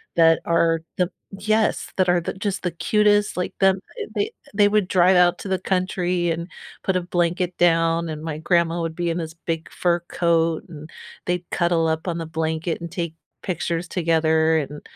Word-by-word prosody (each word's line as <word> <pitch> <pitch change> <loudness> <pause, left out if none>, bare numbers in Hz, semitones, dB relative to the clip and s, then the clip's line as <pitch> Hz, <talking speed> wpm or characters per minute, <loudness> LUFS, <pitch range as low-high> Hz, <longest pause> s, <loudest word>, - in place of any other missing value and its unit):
that 165 -1 +5
are 165 -1 +2 0.2
the 180 0 +1 0.3
yes, 215 +2 +1
that 185 -1 +3
are 175 -1 +3
th 180 - -5
just 205 -2 -2
the 180 - +1
cutest, 210 +4 +2
like, 180 - -2
them 190 -1 +4 0.4
they 425 +3 0 0.2
they 205 0 +5
would 210 -3 +2
drive 185 0 +4
out 175 -1 +4
to - - -7
the 190 - +1
country 180 -2 0
and 170 +2 -3 0.4
put 190 - 0
a - - -1
blanket 175 +1 -1
down, 165 -1 +3
and 155 -1 -5
my 155 -2 -4
grandma 170 +1 +1
would 165 -1 -3
be 175 -1 -1
in 165 - -1
this 160 -1 -5
big 165 -1 -2
fur 175 -1 +1
coat, 165 -2 +1
and 155 -1 -10 0.4
they'd 175 -1 -2
cuddle 170 -2 +2
up 160 +3 -2
on 170 -1 -2
the 165 - -5
blanket, 160 +1 -2
and 170 - -6
take 170 -3 -4 0.3
pictures 175 -1 -2
together 160 -2 +2
and, 145 0 -6
170 Hz, 190 wpm, -23 LUFS, 165-180 Hz, 0.4 s, that